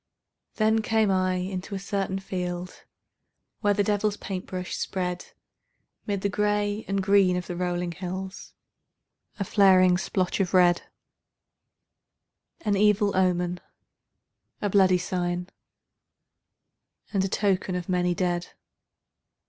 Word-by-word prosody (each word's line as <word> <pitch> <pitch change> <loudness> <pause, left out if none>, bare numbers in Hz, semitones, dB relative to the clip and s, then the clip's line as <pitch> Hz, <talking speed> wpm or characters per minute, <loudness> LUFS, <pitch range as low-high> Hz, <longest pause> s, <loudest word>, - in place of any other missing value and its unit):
Then 220 0 +2
came 220 -2 +2
I 185 -1 +1
into 185 +2 -4
a - - -3
certain 195 -1 -2
field 180 -2 -5 0.7
Where 205 -2 +2
the 205 - +2
devil's 205 0 0
paint 190 -2 -5
brush 185 -1 -4
spread 180 -2 -3 0.8
'Mid 200 -2 -1
the 200 - +1
gray 205 +1 0
and 195 0 0
green 195 -2 +4
of 180 - -4
the 175 - -5
rolling 175 0 -2
hills 185 +2 -7 0.8
A 200 - -1
flaring 185 -2 +5
splotch 185 0 -1
of 190 -1 0
red, 175 -1 +5 1.8
An 205 -7 +1
evil 205 0 +3
omen, 180 -1 +1 1.0
a 205 - -1
bloody 185 -2 +5
sign, 180 0 -2 1.6
And 195 -2 +2
a - - +1
token 190 -2 0
of 180 -1 -4
many 180 -1 +1
dead. 175 -1 -1
190 Hz, 120 wpm, -26 LUFS, 180-200 Hz, 1.8 s, flaring